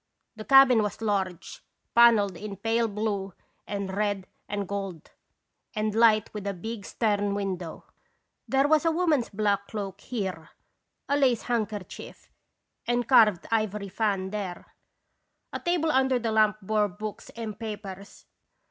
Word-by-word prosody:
The 215 -1 -8
cabin 270 -4 +7
was 210 -3 -3
large, 195 -5 -2 0.3
panelled 225 -5 +5
in 205 +2 -7
pale 225 +3 +1
blue 205 -3 -3 0.3
and 200 -2 -4
red 205 -2 -1 0.2
and 205 -1 -3
gold, 195 -5 -5 0.6
and 215 0 -1
light 220 -1 +4
with 205 -2 -5
a 200 - -2
big 215 +3 -6
stern 205 -3 0
window. 185 -4 -4 0.6
There 270 +1 +3
was 310 +1 +4
a 330 - +3
woman's 320 -7 +1
long - - -17
black 200 -2 +1
cloak 200 -2 -6
here, 190 -9 -4 0.6
a 285 - +2
lace 260 -5 +2
handkerchief 215 -5 -4 0.6
and 240 -1 0
carved 215 -9 +5
ivory 210 -3 -1
fan 195 -2 -1
there. 195 -4 -6 0.8
A - - -3
table 345 -3 +1
under 265 -2 +3
the 230 -2 -2
lamp 215 -1 +3
bore 210 +1 +2
books 210 +2 -7
and 220 -3 -6
papers. 205 -3 -8
210 Hz, 140 wpm, -27 LUFS, 200-230 Hz, 0.8 s, cabin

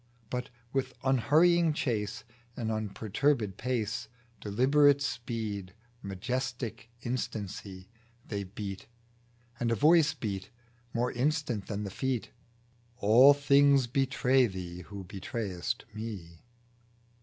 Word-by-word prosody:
But 125 0 -3 0.2
with 135 -1 -1
unhurrying 155 +6 +4
chase, 110 -6 -2 0.3
And 110 -2 -2
unperturbed 110 +1 0
pace, 115 -3 -2 0.3
Deliberate 140 +7 +4
speed, 110 -8 -4 0.3
majestic 120 +3 -4
instancy, 100 -6 -4 0.4
They 100 -2 -3
beat 95 0 -7 0.7
and 120 -1 0
a - - +3
Voice 155 +2 +5
beat 100 -7 -4 0.4
More 120 +2 0
instant 130 -5 -1
than 105 0 -3
the 100 - -5
Feet 130 +2 -2 0.3
" - - -35 0.3
All 125 +6 +7
things 140 -1 +5
betray 130 0 +2
thee, 90 -3 -6
who 100 +1 -8
betrayest 95 0 -4
Me." 100 -7 -7
115 Hz, 105 wpm, -30 LUFS, 100-135 Hz, 0.7 s, All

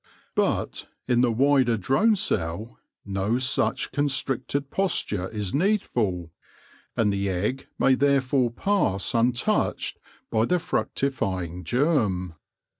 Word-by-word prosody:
But - - -1 0.2
in 120 -1 +3
the 125 -2 +3
wider 130 -1 +3
drone 135 - +3
cell 105 - -2 0.3
no 100 +3 0
such 130 0 +1
constricted 140 0 -1
posture 105 - -1
is 105 -4 -4
needful, 120 - 0 0.7
and 105 -3 +2
the 100 0 -1
egg 105 +9 -2
may 135 - +4
therefore 135 -2 +2
pass 120 - 0
untouched 120 +1 0 0.3
by 110 0 +2
the 180 - +2
fructifying 95 - -2
germ. 110 - +1
120 Hz, 110 wpm, -25 LUFS, 100-140 Hz, 0.7 s, may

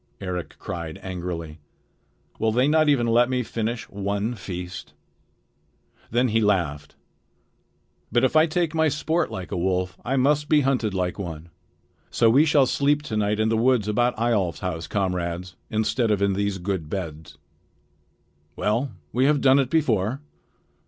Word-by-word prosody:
Eric 90 -3 -5
cried 85 -2 -6
angrily. 85 -4 -5 0.8
"Will 110 0 +2
they 125 +4 +2
not 155 0 +4
even 135 -5 +3
let 120 +2 +3
me 125 -1 0
finish 115 +1 -3
one 100 +3 -2
feast?" 90 -3 -7 1.2
Then 120 +2 +2
he 115 +1 +2
laughed. 85 -9 0 1.2
"But 120 +2 +2
if 130 - +2
I 155 +1 +6
take 170 0 0
my 160 -1 +3
sport 160 +3 0
like 95 -1 -7
a - - -2
wolf, 90 +1 -1
I 130 +3 -1
must 145 +3 +2
be 150 -1 +5
hunted 125 -7 0
like 90 +1 -2
one. 85 -3 -6 0.6
So 115 -1 +3
we 140 +6 +5
shall 145 -3 +4
sleep 145 +3 +1
to 115 -7 -5
night 105 0 0
in 110 0 +2
the 115 - +2
woods 120 -2 +2
about 120 +3 +1
Eyjolf's 100 -9 0
house, 80 -3 -3
comrades, 90 -2 -2
instead 110 +2 0
of 105 -2 +2
in 100 0 +2
these 100 0 -1
good 90 -4 -3
beds. 80 -4 -6 1.2
Well, 115 +7 0 0.2
we 130 +2 +2
have 145 0 +3
done 135 0 +5
it 135 -2 +1
before." 125 - +1
110 Hz, 160 wpm, -24 LUFS, 90-130 Hz, 1.2 s, I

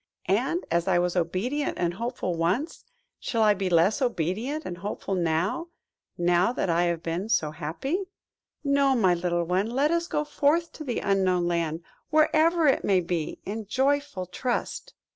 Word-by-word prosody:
And, 255 - 0
as 170 +2 +1
I 185 -2 +3
was 175 0 0
obedient 190 - -1
and 175 -1 0
hopeful 235 -2 -3
once, 185 - -1 0.3
shall 230 -2 0
I 210 -1 +5
be 195 -2 -2
less 180 - +3
obedient 240 - -1
and 175 -1 -6
hopeful 200 0 -4
now–now 175 - -1
that 195 - -1
I 170 +1 +2
have 170 -1 -1
been 175 +6 -3
so 155 -9 +1
happy? 180 - -3 0.6
No, 280 -1 +3
my 190 -7 +4
little 175 0 0
one, 185 +5 0
let 275 +6 +1
us 340 0 0
go 300 - -1
forth 300 +3 +1
to 310 - -8
the 250 -5 -2
Unknown 185 -3 +2
Land, 165 -1 -1 0.3
wherever 315 +2 +3
it 275 - +3
may 190 -2 +3
be, 170 -3 -3
in 215 +1 -5
joyful 280 -4 0
trust." 250 - -3
195 Hz, 160 wpm, -26 LUFS, 175-280 Hz, 0.6 s, I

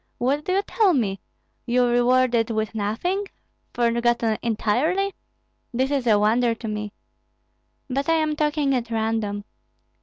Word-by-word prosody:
What 275 +5 0
do 370 - 0
you 395 +1 +2
tell 405 -4 +2
me? 200 -7 -1 0.5
You 245 +1 +3
rewarded 245 -1 +3
with 220 -1 -2
nothing, 240 - -2 0.4
forgotten 235 -1 +1
entirely? 275 - 0 0.6
This 260 +3 0
is 270 -4 0
a 215 -2 +5
wonder 230 +3 +2
to 225 0 -7
me. 210 -1 -4 1.0
But 275 +3 -2
I - - +5
am 310 -1 0
talking 295 -2 +1
at 240 -3 -1
random. 220 -2 -1
240 Hz, 140 wpm, -23 LUFS, 225-290 Hz, 1.0 s, a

